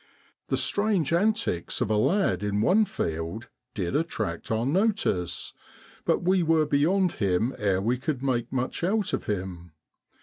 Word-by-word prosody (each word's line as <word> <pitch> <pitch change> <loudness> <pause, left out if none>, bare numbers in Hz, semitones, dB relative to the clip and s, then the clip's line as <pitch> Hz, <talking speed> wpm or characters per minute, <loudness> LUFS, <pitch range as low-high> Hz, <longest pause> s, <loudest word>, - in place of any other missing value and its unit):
The - - 0
strange 205 -7 +1
antics 205 - 0
of 115 -4 0
a - - +3
lad 110 - +2
in 105 0 0
one 205 - +4
field 85 - -4 0.3
did 90 -4 -2
attract 110 - -2
our 110 +1 0
notice, 175 - 0 0.5
but - - +1
we 185 +1 +3
were 160 -2 +3
beyond 175 +6 +2
him 100 +5 0
ere 95 -3 +1
we 120 +3 0
could 135 -1 -3
make 120 -3 -1
much 130 +5 -2
out 200 +2 0
of - - -2
him. 90 -4 -4
125 Hz, 155 wpm, -26 LUFS, -, 0.5 s, one